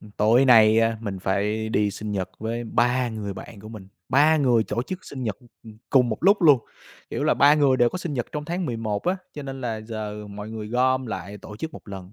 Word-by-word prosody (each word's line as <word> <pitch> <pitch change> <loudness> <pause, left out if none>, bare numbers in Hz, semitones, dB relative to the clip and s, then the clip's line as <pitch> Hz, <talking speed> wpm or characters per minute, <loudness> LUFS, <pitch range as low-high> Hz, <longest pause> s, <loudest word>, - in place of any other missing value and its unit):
ừm, 105 - -14
tối 110 +5 +3
nay 110 -3 +6
á 115 0 +1
mình 100 -4 -5
phải 105 +4 -1
đi 105 -2 +1
sinh 105 +1 -6
nhật 95 -2 -3
với 115 +2 -4
3 125 +2 +1
người 105 -3 -5
bạn 100 +2 -10
của 110 - -11
mình, 105 -4 -10 0.2
3 150 +4 +4
người 125 -6 +3
tổ 115 - -2
chức 185 +7 -7
sinh 130 -2 -7
nhật, 110 -4 -2
ừm, 120 - -20 0.2
ừm, 110 -1 -12
cùng 125 -3 +4
một 110 - -2
lúc 200 +1 +4
luôn, 145 -5 +7 0.5
kiểu - - -2
là, - - +3
3 145 +1 +6
người 140 -3 +3
đều 120 -1 +4
có 185 - -5
sinh 170 -5 -4
nhật 120 -3 -2
trong 150 0 -4
tháng 175 +2 -3
11 115 -4 -3
á, 180 +2 +1 0.2
cho 145 - -6
nên 135 -1 -7
là 115 -3 -3
giờ 105 -1 -6
mọi 105 +1 -8
người 110 -1 -6
gom 130 +2 +1
lại 100 -1 -6
tổ 105 +2 -11
chức 160 +8 -6
một - - -12
lần. 95 -1 -9
115 Hz, 250 wpm, -24 LUFS, 105-130 Hz, 0.5 s, luôn